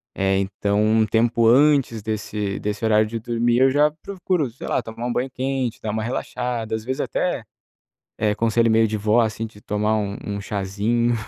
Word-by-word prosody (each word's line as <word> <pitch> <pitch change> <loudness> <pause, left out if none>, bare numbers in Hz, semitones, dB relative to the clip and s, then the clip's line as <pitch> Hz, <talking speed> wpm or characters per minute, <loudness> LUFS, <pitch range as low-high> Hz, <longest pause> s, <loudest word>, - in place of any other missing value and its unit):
eh, 95 0 +1
então 100 +1 0
um 110 +1 +3
tempo 115 +2 +2
antes 135 -3 +4
desse 105 -2 -3
desse 105 +2 -3
horário 110 -1 +4
de 115 +2 -4
dormir, 120 +1 0
eu 135 +1 +5
já 145 +3 +3
procuro, 180 -7 -1
sei 120 - -10
lá, - - +1
tomar 115 +2 -7
um - - -1
banho 125 +2 -1
quente, 130 -2 -3
dar 110 - -3
uma 110 +1 -2
relaxada, 120 -1 -3
às 110 0 -3
vezes 130 +3 -2
até, 175 -10 -1 0.7
eh, 105 -1 +1
conselho 115 +1 +2
meio 110 0 +4
de 110 0 -1
vó, 105 +3 +3
assim, 110 0 -1
de 105 -1 -17
tomar 105 +1 0
um 100 -1 -2
um 100 -1 -4
cházinho, 105 +4 0
110 Hz, 190 wpm, -22 LUFS, 105-120 Hz, 0.7 s, eu